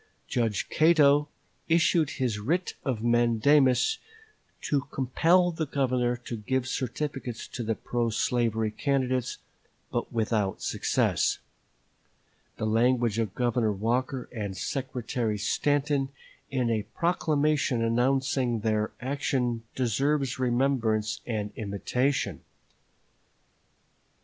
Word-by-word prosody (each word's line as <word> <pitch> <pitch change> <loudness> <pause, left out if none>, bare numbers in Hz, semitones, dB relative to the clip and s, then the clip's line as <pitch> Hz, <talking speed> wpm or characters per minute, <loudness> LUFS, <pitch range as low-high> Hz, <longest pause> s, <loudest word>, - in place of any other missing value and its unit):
Judge 115 -5 0
Cato 150 -2 +4 0.4
issued 165 -2 +3
his 120 -6 -1
writ 170 - -1
of 120 -5 -2
mandamus 120 - +3 0.6
to 140 -2 -1
compel 170 +7 +3
the 160 -2 -3
Governor 125 -3 0
to 120 -1 -6
give 130 +4 -1
certificates 130 -1 -4
to 125 - -5
the 115 -1 -1
pro 120 +1 -1
slavery 110 -1 0
candidates, 130 -1 -1 0.5
but - - -2
without 110 -3 0
success. - - +1 1.2
The - - -2
language 115 0 +2
of 110 -4 -2
Governor 120 -3 +1
Walker 125 +5 -1
and 100 -5 -5
Secretary 125 -3 -2
Stanton 140 +6 +1 0.4
in 125 -3 0
a 110 -2 +1
proclamation 150 -7 +1
announcing 125 0 +1
their 110 -1 0
action 125 -3 -1
deserves 135 +2 0
remembrance 120 -4 +1
and 105 -3 -2
imitation. 120 +6 -1
125 Hz, 100 wpm, -27 LUFS, 115-140 Hz, 1.2 s, Cato